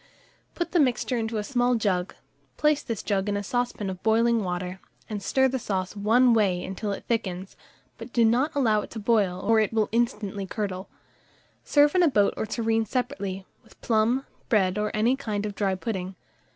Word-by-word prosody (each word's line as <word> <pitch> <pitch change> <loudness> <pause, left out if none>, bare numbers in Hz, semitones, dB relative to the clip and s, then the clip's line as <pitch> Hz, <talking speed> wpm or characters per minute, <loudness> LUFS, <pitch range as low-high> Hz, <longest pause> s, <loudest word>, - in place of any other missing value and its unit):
Put 345 -1 -3
the 350 - +2
mixture 255 -2 +1
into 225 0 -2
a 210 - -1
small 245 +1 +1
jug, 195 -5 -1 0.4
place 300 -1 +2
this 230 -4 -5
jug 200 -1 0
in 205 - 0
a 205 - -3
saucepan 245 -1 -2
of 185 -1 -5
boiling 230 0 +3
water, 180 0 -4 0.3
and 210 -2 -5
stir 265 +6 +2
the 260 0 -2
sauce 190 -3 -3
one 230 +4 +4
way 195 -5 +2
until 195 +2 -4
it 200 - -6
thickens; 190 -5 -2 0.4
but - - -9
do 235 -2 +3
not 255 +8 +2
allow 220 -7 +3
it - - -9
to 225 - -7
boil, 205 -5 +1
or 220 +2 +3
it 215 - +1
will 220 -2 +1
instantly 210 -4 -1
curdle. 195 -2 -4 0.7
Serve 290 0 +4
in 365 - +4
a 345 - +5
boat 205 -6 +3
or 220 - -3
tureen 225 0 0
separately, 200 -5 -3 0.2
with 225 - -22
plum, 235 +4 +1 0.2
bread, 195 -3 +2
or 210 0 0
any 230 +5 +3
kind 215 -6 -3
of 205 - -4
dry 195 -1 0
pudding. 190 -2 -4
215 Hz, 190 wpm, -26 LUFS, 195-240 Hz, 0.7 s, a